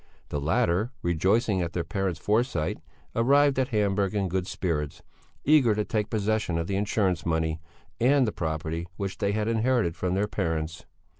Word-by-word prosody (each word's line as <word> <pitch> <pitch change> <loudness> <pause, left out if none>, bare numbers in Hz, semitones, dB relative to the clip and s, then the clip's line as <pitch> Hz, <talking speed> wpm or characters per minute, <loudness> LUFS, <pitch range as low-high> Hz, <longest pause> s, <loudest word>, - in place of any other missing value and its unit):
The 75 - -2
latter, 85 +7 +1
rejoicing 95 +4 +2
at 85 -2 -3
their 85 - -1
parents' 90 +1 -2
foresight, 105 - 0 0.4
arrived 140 +3 +4
at 130 - +2
Hamburg 100 -3 0
in 100 -2 0
good 95 +1 -1
spirits, 75 -8 -3 0.4
eager 135 -7 +5
to 105 0 0
take 110 -3 -1
possession 105 -5 0
of 85 - -1
the 95 - -2
insurance 100 -3 0
money 80 -1 0 0.4
and 130 +3 +4
the 110 - -1
property 80 0 -3
which 100 -1 -4
they 100 -1 +1
had 105 0 0
inherited 115 -5 +1
from 90 0 -1
their 100 +2 +1
parents. 80 -4 -3
100 Hz, 165 wpm, -27 LUFS, 85-110 Hz, 0.4 s, eager